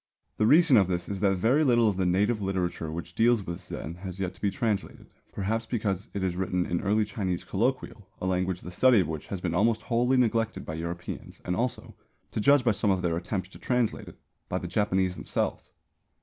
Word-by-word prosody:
The 110 - +3
reason 155 -1 +6
of 95 -3 +5
this 90 -1 -2
is 100 -1 -4
that 100 -1 +3
very 120 +11 +3
little 120 -5 +4
of 105 - +1
the 95 -1 0
native 105 +5 +2
literature 90 -4 -2
which 85 +1 -6
deals 115 0 +3
with 85 +2 -5
Zen 85 -1 -6
has 95 0 -7
yet 95 -2 -4
been 100 - +2
translated, 110 -4 -2 0.3
perhaps 110 +3 -2
because 105 -5 -2
it 100 - -1
is 90 -2 -1
written 90 -1 0
in 85 - -1
early 105 +2 +2
Chinese 95 -4 -3
colloquial, 115 -2 -2
a - - -4
language 95 0 0
the 90 - -8
study 125 +5 +5
of 85 - -2
which 80 -2 -5
has 95 -3 -5
been 90 -2 -2
almost 110 +4 +2
wholly 125 +2 +2
neglected 115 -2 +1
by 80 - -5
Europeans 85 +2 -6
and 90 - -1
also 125 +5 -3 0.4
(to - - -3
judge 140 +5 +5
by 120 - +4
some 105 0 0
of 95 -2 +1
their 85 -2 +1
attempts 90 +2 -3
to - - -14
translate 125 -3 0
it) - - -12 0.3
by - - -1
the - - -4
Japanese 95 -3 0
themselves. - - -2
100 Hz, 215 wpm, -28 LUFS, 90-115 Hz, 0.4 s, reason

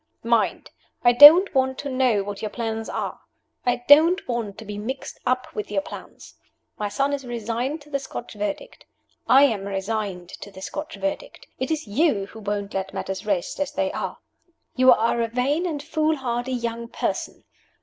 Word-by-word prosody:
Mind! - - 0 0.3
I 240 - +7
don't 310 +9 +9
want 265 -1 +1
to 285 - -5
know 255 -6 +2
what 200 0 -6
your 215 - -3
plans 225 -1 -4
are. - - -4 0.5
I 245 0 +1
don't 330 +6 +6
want 235 -5 -3
to 220 - -9
be 205 0 -6
mixed 260 +6 -6
up 255 0 0
with 210 - -5
your 200 -2 -1
plans. - - -11 0.5
My 210 -1 -1
son 275 +7 0
is 280 -1 -3
resigned 240 +5 -3
to 295 +1 -17
the 280 - 0
Scotch 245 -3 -8
Verdict. 210 - -5 0.4
I 270 +2 +7
am 220 -8 +2
resigned 195 -2 -3
to 200 - -10
the 190 -1 -12
Scotch 305 +8 -6
Verdict. 295 +12 -5
It 260 - -2
is 315 -1 -2
you 215 -2 +1
who 220 +3 -12
won't 205 -1 -3
let 190 0 -4
matters 190 +2 -4
rest 195 +2 -1
as 290 - -2
they - - 0
are. - - -4 0.6
You 255 0 +6
are 235 0 +2
a 230 - +1
vain 275 +9 0
and 295 -4 -4
foolhardy 270 -6 -1
young 235 -1 -3
person. - - -4
240 Hz, 180 wpm, -24 LUFS, 210-285 Hz, 0.6 s, don't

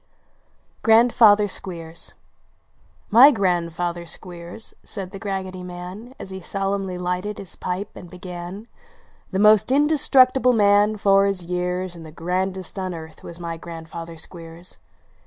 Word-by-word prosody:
159 225 -1 +6
GRANDFATHER - - 0
SOl 190 0 -5
EERS 165 0 -6 1.2
grandfather 175 -3 -1
Squcers," 175 +4 -7
said 190 -3 -6
The 195 - -8
Raggedy 190 -2 -4
Man, 180 +6 -8
Vs - - -9
he 190 0 -7
solemnly 195 0 -2
lighted 180 +3 -3
his 195 -4 -9
pipe 185 +3 -4
and 175 - -10
began 180 +3 -8 0.3
" - - -34
The 190 - -1
most 210 +3 +5
indestructible 265 -3 +4
man, 205 0 +4
for 195 -1 +4
his 195 -3 0
years, 180 +1 -2
And 165 - -10
the 160 - -10
grandest 185 +3 -3
on 185 -2 -3
earth, 160 -1 -10
was 170 0 -8
my 170 -1 -5
grandfather 165 0 -8
Squeers 165 +1 -8
185 Hz, 140 wpm, -23 LUFS, 175-205 Hz, 1.2 s, 159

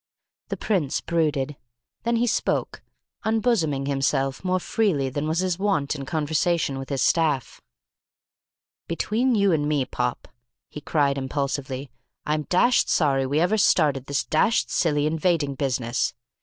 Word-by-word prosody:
The - - -4
Prince 175 -11 0
brooded. 150 -4 -1 0.5
Then 235 0 +2
he 235 +1 +2
spoke, 240 - -1 0.4
unbosoming 220 - +1
himself 135 0 0
more 185 0 +1
freely 175 - 0
than 145 +3 -3
was 160 +3 0
his 185 -1 -1
wont 190 -9 0
in 140 -2 -6
conversation 155 -1 0
with 135 - -7
his 135 -3 0
staff. 150 -7 +1 1.3
"Between 230 +9 0
you 200 -2 +3
and 150 -2 +1
me, 145 -3 +1
Pop," 125 -1 -3 0.4
he 150 - -8
cried 140 -2 +1
impulsively, 135 -1 -3 0.3
"I'm 150 0 -1
dashed 240 +7 +3
sorry 135 -4 +2
we 145 +3 +1
ever 190 +6 +2
started 145 -9 +3
this 140 0 0
dashed 220 +9 +1
silly 150 -4 +1
invading 155 -2 +1
business. 125 -4 -1
150 Hz, 140 wpm, -24 LUFS, 135-180 Hz, 1.3 s, you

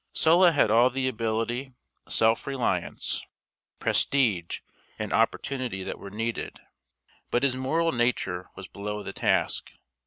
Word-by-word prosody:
Sulla 170 +2 +5
had 145 -8 +3
all 120 +3 +6
the 130 +1 -1
ability, 115 +2 -2 0.4
self 115 +3 +2
reliance, 120 -10 -1 0.6
prestige, 110 -12 +1 0.4
and - - -3
opportunity 125 -8 0
that - - -5
were 100 - -8
needed. 115 +3 -4 0.7
But 120 - +1
his 140 -2 +4
moral 160 +6 +1
nature 115 -7 0
was 95 - -8
below 105 +1 -5
the - - -6
task. - - 0
120 Hz, 125 wpm, -27 LUFS, 105-135 Hz, 0.7 s, all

